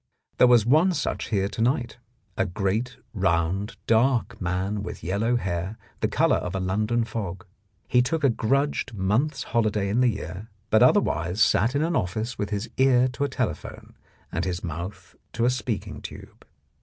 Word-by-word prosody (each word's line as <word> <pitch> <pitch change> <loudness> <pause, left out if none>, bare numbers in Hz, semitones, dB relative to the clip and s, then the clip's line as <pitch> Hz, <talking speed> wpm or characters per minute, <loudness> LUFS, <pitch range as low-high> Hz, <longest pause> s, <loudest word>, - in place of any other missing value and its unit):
There 125 - +8
was 120 -3 +5
one 160 +9 +4
such 150 - -2
here 100 -3 +1
to 115 - -5
night, 120 0 0 0.4
a 95 - 0
great, 100 +7 -2 0.2
round, 95 +1 0
dark 120 -1 +2
man 95 +3 -1
with 100 - -7
yellow 100 +8 0
hair, 95 -1 -2 0.2
the - - +1
colour - - +2
of 90 +1 -4
a - - 0
London 105 +5 0
fog. 100 -5 -5 0.4
He 125 - +4
took 155 +5 -1
a 140 - +5
grudged 135 +2 0
month's 110 +10 0
holiday 105 -3 0
in 115 +5 +2
the 125 - +5
year, 100 0 -6 0.2
but 110 - +5
otherwise 110 - +3
sat 115 +3 +3
in 145 - +2
an 165 +1 0
office 110 - -1
with 100 -1 -3
his 105 +1 -2
ear 130 -1 +4
to 135 +3 -2
a - - -3
tele - - 0
phone - - -12 0.4
and - - -1
his 90 -2 -3
mouth 90 +3 -6 0.2
to 115 +1 +1
a 125 - +4
speaking 125 -4 -4
tube. - - -11
110 Hz, 180 wpm, -25 LUFS, 95-125 Hz, 0.4 s, There